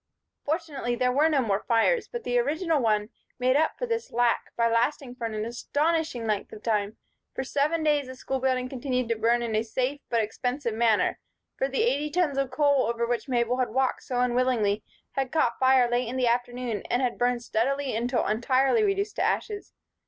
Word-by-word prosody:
Fortunately, 295 -6 -2
there 250 +1 +1
were 295 +5 +3
no 290 -4 +2
more 200 -3 +1
fires; 240 - +2
but 475 -1 -6
the 245 0 +1
original 310 +4 0
one 215 -2 +1 0.3
made 255 +1 +2
up 315 +2 +2
for - - -2
this 460 -1 -3
lack 240 0 +1
by 230 0 +2
lasting 245 +3 0
for 250 -2 -5
an 215 -1 -3
astonishing 295 +2 -1
length 210 -2 -2
of 210 - -11
time. 210 -2 -1 0.4
For - - -2
seven 295 +5 0
days 295 -3 +2
the 260 - -8
school 265 +1 -3
building 255 -1 0
continued 255 -2 -2
to 230 - +2
burn 235 +2 +2
in 225 -2 -2
a 215 - +2
safe 255 +5 -2
but 230 -2 +2
expensive 245 +3 -3
manner; 225 -1 +2 0.4
for - - 0
the 450 - 0
eighty 300 -11 +1
tons 300 -4 +1
of 275 -1 0
coal 280 -2 +2
over 235 0 0
which 240 +3 -2
Mabel 245 0 +1
had 255 - +1
walked 260 +3 0
so 250 -1 -3
unwillingly 240 -4 +1 0.3
had 270 -2 -2
caught 310 -7 +1
fire 260 -1 +5
late 240 0 0
in 250 +3 -4
the 255 - +2
afternoon 245 -2 -1
and 245 +2 +1
had 245 -2 -1
burned 245 0 +1
steadily 265 +3 -1
until 240 +2 0
entirely 260 - +2
reduced 400 0 0
to - - 0
ashes. 415 -2 -1
250 Hz, 200 wpm, -27 LUFS, 235-285 Hz, 0.4 s, fire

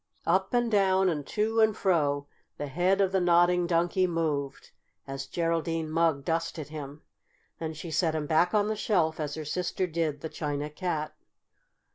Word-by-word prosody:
Up 190 +1 +2
and 240 -1 +1
down 190 -2 +3
and 150 -5 -3
to 220 +1 0
and 220 -1 +4
fro 145 -6 +1 0.3
the 145 - -3
head 180 +7 +1
of 190 -1 +2
the 190 - +2
Nodding 175 0 +4
Donkey 175 +2 +2
moved 155 -5 -2 0.3
as 135 0 -6
Geraldine 165 -1 -1
Mugg 160 -4 +1
dusted 165 -2 -2
him. 150 -1 -8 0.6
Then 160 -1 -4
she 160 +2 -7
set 160 +1 +1
him 155 -1 -2
back 160 +4 +3
on 205 0 +3
the 215 - -1
shelf, 170 -7 +1
as 150 -1 -3
her 155 -1 -6
sister 180 +4 -1
did 160 -4 -2
the - - -3
China 150 -1 -3
Cat. 155 -2 -3
165 Hz, 170 wpm, -28 LUFS, 150-185 Hz, 0.6 s, and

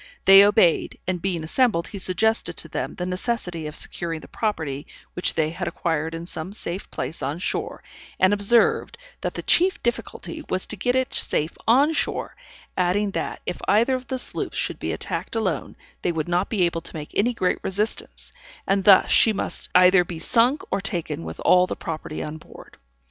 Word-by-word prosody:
They 195 +1 +10
obeyed, 205 -5 +3
and 180 -1 -2
being 175 -4 -1
assembled, 170 -1 +1
he 200 - -7
suggested 220 +5 0
to - - -5
them - - -4
the 180 - -4
necessity 180 -4 -2
of 150 - -7
securing 165 -2 -3
the - - -12
property 160 -10 -3 0.3
which 180 - 0
they 155 -1 +1
had 175 +1 -4
acquired 165 -1 -2
in 165 +1 -6
some 175 +2 -6
safe 185 -2 -6
place 160 - -5
on 140 +3 -2
shore, 180 - -3 0.4
and 190 +2 +4
observed, 225 - +2 0.2
that - - -3
the - - -4
chief 370 +2 +2
difficulty 295 +6 -4
was 185 - 0
to - - -4
get 245 +6 0
it 260 0 0
safe 155 +3 +1
on 275 +7 +5
shore; - - -2 0.4
adding 190 +3 +1
that, - - -4
if - - -4
either 235 +5 +3
of 255 -1 -3
the 260 - -2
sloops 250 - -3
should - - -2
be - - -2
attacked - - -3
alone, 215 -6 -2 0.3
they 175 - 0
would 160 -2 -3
not 175 +2 0
be 205 -5 +1
able 170 -1 0
to 165 - -8
make 150 -1 -7
any 240 +4 +1
great 185 -5 0
resistance, 205 +4 -2 0.3
and 195 0 +1
thus 200 -3 +7
she 225 - +5
must 205 - -2
either 180 0 +7
be 170 -1 -7
sunk 235 - +2
or 200 - 0
taken 175 - -3
with 80 0 -7
all 180 0 +5
the - - -4
property 155 -2 -5
on 155 +1 -6
board. - - -15
185 Hz, 190 wpm, -23 LUFS, 165-220 Hz, 0.4 s, They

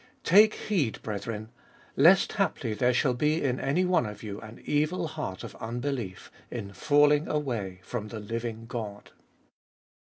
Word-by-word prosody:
Take 210 +5 +6
heed, 160 - -1
brethren, 110 +1 -4 0.5
lest 175 +8 +6
haply 155 - 0
there 125 +4 +2
shall 125 +1 +2
be 150 +6 +1
In 130 -2 0
any 175 +7 +1
one 180 -10 +2
of 105 +1 -8
you 105 -2 -6
an 110 +2 -11
evil 155 +4 +1
heart 150 -13 -5
of - - -7
unbelief, 120 -4 -4 0.2
in 100 -5 -6
falling 145 +7 +4
away 115 -11 -2
from 110 0 -4
the 110 0 -6
living 115 +1 -4
God. 110 -4 -6
120 Hz, 150 wpm, -28 LUFS, 110-150 Hz, 0.5 s, Take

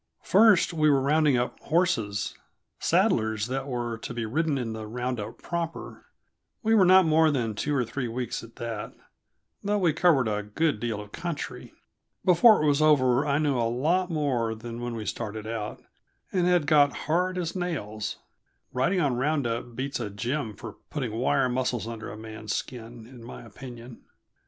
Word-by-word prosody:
First, 205 -4 +5
we 155 -2 +3
were 140 -2 +4
rounding 145 0 +3
up 120 0 -2
horses 115 - 0 0.5
saddlers 110 -1 +2
that 135 +3 -3
were 120 -3 -3
to 120 - -7
be 115 -1 -2
ridden 150 +5 0
in 115 -4 -3
the 110 -1 -6
round 125 +2 -3
up 105 - -7
proper. 170 -1 -5 0.6
We 225 0 +3
were 205 -4 +6
not 185 0 +7
more 160 0 +4
than 120 -7 -1
two 145 +7 -1
or 125 -3 +1
three 125 +2 -3
weeks 120 +1 -3
at 115 0 -13
that, 115 -3 -5 0.7
though 205 +1 +1
we 175 -6 +2
covered 155 -6 +3
a 105 -1 -1
good 105 +6 -1
deal 115 -3 -2
of 105 0 -12
country. 170 -4 -5 0.5
Before 185 +1 +6
it - - +2
was 145 0 +3
over 135 -4 +4
I 140 0 +2
knew 145 -3 +1
a 115 -1 +1
lot 165 +10 +1
more 130 -8 0
than 115 +1 -7
when 120 -1 -4
we 110 -2 -5
started 110 -1 -4
out, 110 -1 -5 0.5
and 180 -2 +1
had 175 -4 +3
got 145 -1 +3
hard 180 +4 +1
as 170 -1 -3
nails; 120 - -3 0.6
riding 135 +10 +1
on 140 -7 +1
round 145 +1 0
up 115 0 -3
beats 135 +2 -3
a 115 -4 -3
gym 115 +2 -3
for 110 -1 -9
putting 130 -7 -3
wire 130 +3 +1
muscles 125 -2 -1
under 115 -1 -6
a - - -8
man's 110 0 -5
skin, 120 -2 -6
in 120 -1 -13
my 120 - -9
opinion. 120 +1 -11
125 Hz, 180 wpm, -27 LUFS, 115-155 Hz, 0.7 s, not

